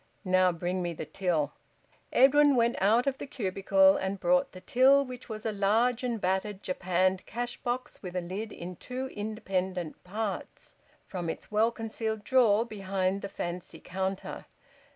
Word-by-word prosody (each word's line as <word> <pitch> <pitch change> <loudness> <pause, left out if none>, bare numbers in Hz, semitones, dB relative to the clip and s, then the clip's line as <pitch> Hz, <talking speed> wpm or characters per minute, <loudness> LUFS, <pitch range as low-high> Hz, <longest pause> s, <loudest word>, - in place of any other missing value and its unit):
"Now 185 0 +4
bring 175 +2 -2
me 175 -1 -2
the - - -6
till." 175 -6 -1 0.6
Edwin 285 +2 +6
went 235 0 +3
out 220 +5 +4
of 275 -1 -1
the - - -6
cubicle 195 -5 +3
and 190 +1 -2
brought 180 0 +2
the 185 - -11
till, 270 +5 +5
which 250 -1 -9
was 215 0 -6
a 220 - +1
large 225 +5 +2
and 240 -3 -1
battered 190 +2 -1
japanned 185 0 +1
cash 240 +2 -4
box 250 0 -4
with 180 -2 -7
a 180 - 0
lid 195 +5 -5
in 180 0 -7
two 260 +1 -5
independent 190 -6 -3
parts, 205 +1 -5 0.3
from 175 -3 -4
its 160 - -6
well 215 +2 +4
concealed 220 -1 -4
drawer 230 -3 +4
behind 195 -3 -1
the 200 - -5
fancy 175 -2 -5
counter. 190 +1 -4
200 Hz, 160 wpm, -29 LUFS, 185-235 Hz, 0.6 s, Edwin